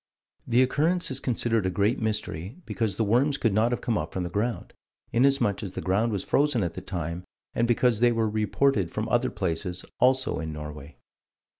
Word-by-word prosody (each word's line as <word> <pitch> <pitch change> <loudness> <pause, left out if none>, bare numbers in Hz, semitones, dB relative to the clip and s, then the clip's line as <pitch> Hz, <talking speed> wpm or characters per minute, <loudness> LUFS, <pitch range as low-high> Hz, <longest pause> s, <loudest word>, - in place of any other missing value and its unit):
The 120 +2 +4
occurrence 160 +6 +1
is 130 - -2
considered 115 -5 0
a - - +1
great 100 +5 +1
mystery, 105 - -3
because 110 -5 -2
the 110 - 0
worms 130 +7 +2
could 115 -7 +1
not 110 +3 +3
have 120 - -1
come 115 -3 0
up - - -4
from 95 - -2
the 85 - -4
ground, 110 +5 -2 0.4
inasmuch 125 -4 +3
as 95 -4 -6
the - - -4
ground 105 +5 +1
was 100 -3 -2
frozen 140 -6 +2
at 85 - -2
the - - -6
time, 85 -1 -4 0.3
and 115 - +1
because 120 -1 +2
they 120 0 +5
were 115 -1 +1
reported 110 -1 +1
from - - -3
other - - +2
places, 90 0 -3
also, 130 +1 +2
in 80 -1 -4
Norway. 75 -1 -8
110 Hz, 195 wpm, -26 LUFS, 95-125 Hz, 0.4 s, they